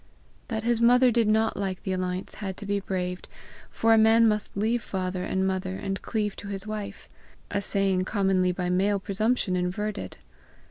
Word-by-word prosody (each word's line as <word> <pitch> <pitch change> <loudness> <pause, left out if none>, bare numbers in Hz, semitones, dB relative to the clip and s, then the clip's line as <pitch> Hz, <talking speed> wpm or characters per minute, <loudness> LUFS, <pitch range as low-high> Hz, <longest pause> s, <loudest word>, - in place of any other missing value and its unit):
That 220 -2 -3
his 235 0 +1
mother 245 +1 +6
did 230 -1 +2
not 220 +1 +2
like 190 -2 -3
the 190 - -2
alliance 185 0 -3
had 190 -2 -4
to 205 - -7
be 200 0 0
braved, 180 -2 -4 0.4
for 225 0 +3
a 225 - +6
man 225 +1 +6
must 210 -2 -1
leave 225 +3 +1
father 185 -2 -3
and 190 +1 0
mother 190 0 -2
and 195 0 -4
cleave 210 -3 -2
to 205 - -8
his 195 0 -5
wife 210 -2 -6 0.4
a 200 - 0
saying 195 -2 +1
commonly 190 -3 +2
by 180 0 -2
male 200 +2 +2
presumption 205 0 0
inverted. 195 +4 -3
200 Hz, 180 wpm, -26 LUFS, 185-220 Hz, 0.4 s, mother